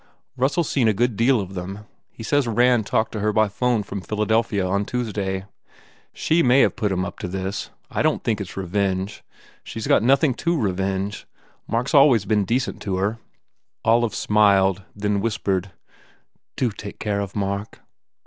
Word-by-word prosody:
Russell 135 Hz, +5 st, +1 dB
s 160 Hz, -, -2 dB
seen 125 Hz, -5 st, +2 dB
a 110 Hz, -, +2 dB
good 120 Hz, +2 st, +1 dB
deal 120 Hz, +3 st, +3 dB
of 95 Hz, -1 st, -5 dB
them. 95 Hz, +3 st, -6 dB, 0.2 s
He 115 Hz, -, -11 dB
says 145 Hz, +2 st, +1 dB
Rand 120 Hz, -1 st, +3 dB
talked 110 Hz, 0 st, +1 dB
to 110 Hz, -, -4 dB
her 105 Hz, +1 st, +1 dB
by 110 Hz, 0 st, +3 dB
phone 120 Hz, +2 st, 0 dB
from 100 Hz, 0 st, -6 dB
Philadelphia 105 Hz, 0 st, 0 dB
on 100 Hz, +2 st, 0 dB
Tuesday. 100 Hz, -5 st, -3 dB, 0.7 s
She 165 Hz, +2 st, +1 dB
may 130 Hz, 0 st, +5 dB
have -, -, +3 dB
put 105 Hz, -4 st, -1 dB
him 95 Hz, -1 st, 0 dB
up -, -, -8 dB
to -, -, -4 dB
this. 95 Hz, +2 st, -4 dB, 0.2 s
I -, -, -1 dB
don -, -, +3 dB
t -, -, -16 dB
think 110 Hz, -3 st, 0 dB
it 100 Hz, -, -5 dB
s -, -, -12 dB
revenge. 95 Hz, +1 st, -2 dB, 0.4 s
She -, -, -9 dB
s 110 Hz, -, -4 dB
got -, -, +4 dB
nothing 135 Hz, +4 st, +3 dB
to 170 Hz, +5 st, -1 dB
revenge. 95 Hz, -1 st, -2 dB, 0.4 s
Mark 115 Hz, +2 st, 0 dB
s -, -, -5 dB
always 135 Hz, -8 st, +6 dB
been 105 Hz, -1 st, +1 dB
decent 125 Hz, +5 st, -1 dB
to 95 Hz, -2 st, -2 dB
her. 95 Hz, +3 st, +1 dB
n 115 Hz, -, -10 dB, 0.7 s
Olive 115 Hz, -3 st, +3 dB
smiled 100 Hz, -3 st, +3 dB
and 100 Hz, -, -12 dB
then 105 Hz, -1 st, +1 dB
whispered, 100 Hz, -4 st, -1 dB
u -, -, -19 dB, 0.8 s
Do 125 Hz, -3 st, 0 dB
take 100 Hz, 0 st, -9 dB
care 105 Hz, -2 st, -1 dB
of 100 Hz, -1 st, -6 dB
Mark." 100 Hz, +1 st, -3 dB
105 Hz, 195 wpm, -23 LUFS, 95-120 Hz, 0.8 s, always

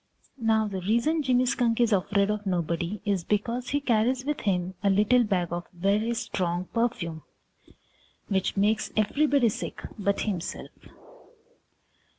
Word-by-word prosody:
Now 220 Hz, -1 st, +2 dB
the 190 Hz, -2 st, -4 dB
reason 235 Hz, -, +1 dB
Jimmy 255 Hz, -2 st, +2 dB
Skunk 240 Hz, -2 st, +1 dB
is 235 Hz, -2 st, +3 dB
afraid 200 Hz, +1 st, +2 dB
of 210 Hz, -1 st, -4 dB
nobody 170 Hz, +2 st, -1 dB
is 200 Hz, -4 st, 0 dB
because 235 Hz, +5 st, -1 dB
he 285 Hz, -, +1 dB
carries 250 Hz, 0 st, +1 dB
with 295 Hz, 0 st, -1 dB
him 185 Hz, -2 st, 0 dB
a 200 Hz, -, +2 dB
little 210 Hz, +5 st, +4 dB
bag 185 Hz, -6 st, 0 dB
of 175 Hz, 0 st, -4 dB
very 205 Hz, +6 st, +1 dB
strong 180 Hz, -4 st, -2 dB
perfume 195 Hz, -9 st, -1 dB, 1.1 s
which 195 Hz, -1 st, -1 dB
makes 210 Hz, +2 st, +2 dB
everybody 275 Hz, +3 st, +3 dB
sick -, -, -5 dB, 0.2 s
but 200 Hz, 0 st, 0 dB
himself. 185 Hz, -5 st, -4 dB
210 Hz, 140 wpm, -27 LUFS, 190-235 Hz, 1.1 s, little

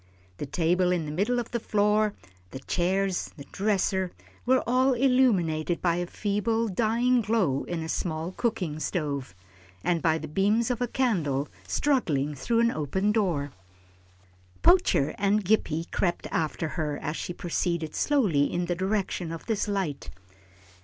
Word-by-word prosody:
The 145 Hz, -, -5 dB
table 180 Hz, +4 st, +2 dB
in 175 Hz, -3 st, 0 dB
the 150 Hz, -, -5 dB
middle 205 Hz, +10 st, 0 dB
of 240 Hz, -2 st, -3 dB
the 235 Hz, -, -1 dB
floor, 210 Hz, 0 st, +2 dB, 0.3 s
the -, -, -7 dB
chairs, 185 Hz, +4 st, 0 dB
the 140 Hz, -, -8 dB
dresser, 190 Hz, -2 st, 0 dB, 0.4 s
were 260 Hz, +1 st, +4 dB
all 255 Hz, +2 st, +3 dB
illumined 200 Hz, -, +2 dB
by 170 Hz, -1 st, +1 dB
a 175 Hz, 0 st, -2 dB
feeble, 220 Hz, +4 st, 0 dB
dying 235 Hz, +5 st, +2 dB
glow 200 Hz, -11 st, +1 dB
in 170 Hz, -2 st, -3 dB
a -, -, -5 dB
small 160 Hz, +1 st, -2 dB
cooking 190 Hz, -9 st, -2 dB
stove, 140 Hz, -, -3 dB, 0.5 s
and 170 Hz, -2 st, +1 dB
by 160 Hz, -1 st, +2 dB
the 155 Hz, -, -6 dB
beams 210 Hz, +9 st, +1 dB
of 245 Hz, -, -3 dB
a 245 Hz, -, +1 dB
candle 165 Hz, -, 0 dB, 0.2 s
struggling 155 Hz, -, +1 dB
through 230 Hz, -, 0 dB
an 235 Hz, 0 st, +3 dB
open 190 Hz, -, 0 dB
door. 175 Hz, -10 st, 0 dB, 1.1 s
Poacher 345 Hz, -, +4 dB
and 200 Hz, +1 st, +2 dB
Gippie 170 Hz, -5 st, +1 dB
crept 175 Hz, -2 st, -1 dB
after 160 Hz, 0 st, -1 dB
her 150 Hz, -3 st, -2 dB
as 150 Hz, 0 st, -4 dB
she -, -, -4 dB
proceeded 170 Hz, -2 st, -2 dB
slowly 205 Hz, -, +2 dB
in 175 Hz, 0 st, -1 dB
the 175 Hz, -, -1 dB
direction 190 Hz, -2 st, -1 dB
of 165 Hz, -, -7 dB
this 220 Hz, -3 st, -1 dB
light. 190 Hz, -8 st, -2 dB
185 Hz, 155 wpm, -27 LUFS, 160-220 Hz, 1.1 s, were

